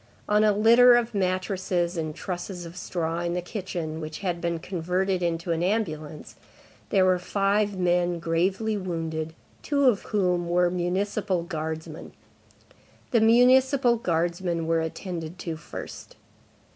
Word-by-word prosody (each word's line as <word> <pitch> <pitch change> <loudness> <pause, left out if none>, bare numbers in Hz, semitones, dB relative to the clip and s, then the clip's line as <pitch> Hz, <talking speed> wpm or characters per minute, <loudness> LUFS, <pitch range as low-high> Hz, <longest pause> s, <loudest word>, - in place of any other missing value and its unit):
On 210 +1 +3
a 215 - +5
litter 235 +4 +6
of 240 -1 0
mattresses 185 -2 -1
and 155 -2 -3
trusses 180 -1 -5
of 170 +1 -10
straw 170 -2 -3
in 175 0 -2
the - - 0
kitchen, 175 -5 -5
which 155 +2 -7
had 175 -3 -2
been 170 -1 -1
converted 180 +2 -1
into 170 0 -1
an 165 0 0
ambulance, 160 -6 -3 0.5
there 190 -2 +4
were 185 -1 +3
five 200 +2 0
men 175 -1 +1
gravely 185 +6 0
wounded, 160 -4 -4 0.3
two 280 -1 +1
of 235 -6 +4
whom 180 -4 0
were 175 0 +3
municipal 185 +1 -1
guardsmen. 160 -1 -6 1.0
The 230 - +4
municipal 250 +2 +5
guardsmen 170 -3 -1
were 165 0 +1
attended 165 0 -5
to 165 -2 -3
first. 155 - -9
180 Hz, 135 wpm, -26 LUFS, 165-200 Hz, 1.0 s, litter